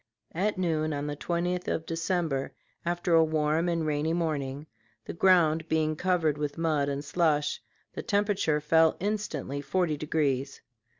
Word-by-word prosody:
At 200 +5 0
noon 155 -4 0
on 145 0 -3
the 145 0 -3
20th 175 +4 -2
of 160 - -1
December, 165 -4 -2 0.3
after 175 0 -1
a 165 0 +7
warm 155 +2 +1
and 165 -2 0
rainy 155 +1 0
morning, 150 -4 -2 0.4
the - - -6
ground 165 -3 +3
being 155 -1 +1
covered 165 -4 +1
with 145 -1 -3
mud 155 -4 +1
and 140 +1 -3
slush, 150 -3 +1 0.3
the - - -4
temperature 200 -7 +1
fell 160 +2 +3
instantly 185 -9 -3
forty 160 +1 0
degrees. 140 -3 -1
160 Hz, 145 wpm, -28 LUFS, 150-175 Hz, 0.4 s, a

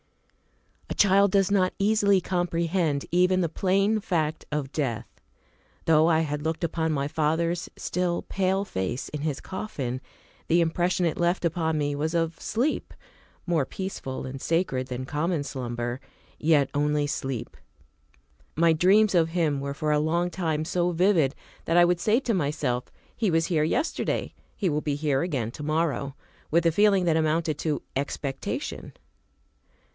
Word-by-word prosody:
A - - -3
CHILD 200 0 +4
does 195 -1 +3
not 185 -2 +2
easily 200 -1 +3
comprehend 170 -4 0
even 180 +2 +3
the 170 - 0
plain 195 +5 +1
fact 160 -5 -1
of 145 -2 -2
death. 120 -8 -2 0.8
Though 160 0 +5
I 160 -2 +4
had 150 -2 -2
looked 160 +2 -2
upon 160 -1 0
my 140 -2 0
father's 160 +3 0
still, 180 -1 -1
pale 190 +1 0
face 95 - -3
in 150 - -5
his 150 -3 -2
coffin, 135 - -4 0.5
the 170 - +4
impression 175 +2 +1
it 165 - -1
left 175 +1 +1
upon 160 -1 0
me 145 -1 0
was 155 +3 -2
of 165 -1 0
sleep; 250 +8 -1 0.5
more 165 -6 +1
peaceful 160 -8 -5
and 130 +1 -7
sacred 165 -7 0
than 130 0 -4
common 150 +3 -1
slumber, 120 -2 -4 0.4
yet 150 -3 +3
only 150 0 +1
sleep. 135 -4 -4 1.0
My 165 +1 +4
dreams 195 +6 +4
of 165 -2 +4
him 160 -5 0
were 140 0 -4
for 150 0 -1
a 150 - +3
long 170 +3 +1
time 160 -3 -1
so 175 +1 0
vivid 170 -5 +3 0.3
that 165 - +2
I 175 - +8
would 175 0 +1
say 215 +6 +3
to 245 -4 0
myself, 145 -7 -1 0.3
"He 215 -5 0
was 165 0 +2
here 160 -4 +1
yesterday; 305 - -1 0.2
he 195 - 0
will 150 -1 0
be 145 -2 -1
here 145 -2 0
again 135 -10 -2
to 150 - -8
morrow," 155 -3 -1 0.3
with 170 +2 +2
a 165 - +5
feeling 195 +1 +4
that 165 -2 +3
amounted 160 -1 +1
to 155 -3 -1
expectation. 140 0 -4
160 Hz, 160 wpm, -26 LUFS, 145-180 Hz, 1.0 s, I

